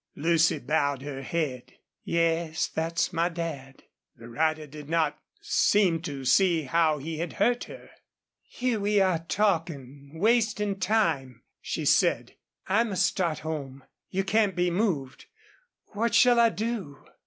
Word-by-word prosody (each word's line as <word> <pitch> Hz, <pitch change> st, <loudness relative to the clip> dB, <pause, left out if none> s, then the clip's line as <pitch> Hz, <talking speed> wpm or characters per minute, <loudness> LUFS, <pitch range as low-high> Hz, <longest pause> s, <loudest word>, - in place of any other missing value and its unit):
Lucy 165 Hz, +2 st, +2 dB
bowed 140 Hz, -1 st, -1 dB
her 140 Hz, -2 st, -6 dB
head. 135 Hz, -4 st, -3 dB, 0.3 s
"Yes, 165 Hz, -1 st, 0 dB
that's 165 Hz, +3 st, -2 dB
my 170 Hz, +1 st, +1 dB
dad." 155 Hz, -6 st, -6 dB, 0.3 s
The 115 Hz, -1 st, -13 dB
rider 155 Hz, +4 st, 0 dB
did 150 Hz, 0 st, -11 dB
not 160 Hz, -3 st, 0 dB, 0.2 s
seem 185 Hz, -6 st, +2 dB
to 140 Hz, -5 st, -6 dB
see 170 Hz, +1 st, +3 dB
how 155 Hz, +2 st, +2 dB
he 155 Hz, +2 st, -6 dB
had 170 Hz, 0 st, -4 dB
hurt 240 Hz, +4 st, +1 dB
her. -, -, -12 dB, 0.5 s
"Here 250 Hz, -3 st, -2 dB
we 205 Hz, 0 st, +2 dB
are 185 Hz, -4 st, +2 dB
talking 155 Hz, -6 st, -2 dB
wasting 210 Hz, -1 st, +1 dB
time," 165 Hz, -, 0 dB, 0.2 s
she -, -, -4 dB
said. -, -, +2 dB, 0.3 s
"I 205 Hz, +5 st, +2 dB
must 195 Hz, -4 st, 0 dB
start 170 Hz, -3 st, -1 dB
home. 140 Hz, -4 st, -5 dB, 0.3 s
You 195 Hz, +1 st, -1 dB
can't 200 Hz, -1 st, +1 dB
be 180 Hz, 0 st, +1 dB
moved. 170 Hz, -, -2 dB, 0.7 s
What 230 Hz, +3 st, 0 dB
shall 245 Hz, -1 st, +5 dB
I 230 Hz, -1 st, +6 dB
do?" 215 Hz, -, -5 dB
165 Hz, 140 wpm, -27 LUFS, 145-195 Hz, 0.7 s, I